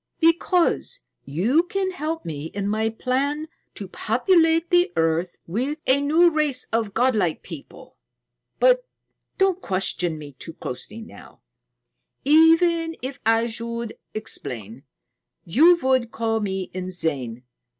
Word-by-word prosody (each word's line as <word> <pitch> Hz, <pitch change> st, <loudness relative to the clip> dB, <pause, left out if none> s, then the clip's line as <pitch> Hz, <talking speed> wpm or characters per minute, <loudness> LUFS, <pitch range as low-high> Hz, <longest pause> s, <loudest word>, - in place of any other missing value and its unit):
"Because 345 Hz, +7 st, +2 dB, 0.3 s
you 200 Hz, -, +2 dB
can 375 Hz, +2 st, -2 dB
help 325 Hz, -2 st, -4 dB
me 150 Hz, -2 st, -5 dB
in 200 Hz, +4 st, -4 dB
my 220 Hz, +2 st, 0 dB
plan 275 Hz, +6 st, -1 dB, 0.3 s
to 200 Hz, -, -7 dB
populate 325 Hz, -, +2 dB
the 355 Hz, +1 st, +4 dB
earth 165 Hz, +2 st, 0 dB
with 255 Hz, -, -2 dB
a 265 Hz, +2 st, +3 dB
new 325 Hz, +4 st, +4 dB
race 300 Hz, -5 st, 0 dB
of 220 Hz, -3 st, -1 dB
godlike 220 Hz, -9 st, +1 dB
people. 160 Hz, -6 st, -11 dB, 0.6 s
But -, -, +4 dB, 0.5 s
don't 385 Hz, -2 st, +2 dB
question 180 Hz, -, 0 dB
me 150 Hz, -2 st, -9 dB
too 165 Hz, -, -8 dB
closely 205 Hz, -, -6 dB
now. 220 Hz, -, -14 dB, 0.8 s
Even 325 Hz, +2 st, +4 dB
if 265 Hz, +1 st, -5 dB
I 225 Hz, +1 st, +4 dB
should 235 Hz, 0 st, -5 dB, 0.2 s
explain, 125 Hz, -, -3 dB, 0.6 s
you 320 Hz, -, +5 dB
would 260 Hz, -3 st, +2 dB
call 225 Hz, -1 st, -1 dB
me 190 Hz, -3 st, -3 dB
insane. 160 Hz, -10 st, -3 dB
235 Hz, 120 wpm, -23 LUFS, -, 0.8 s, you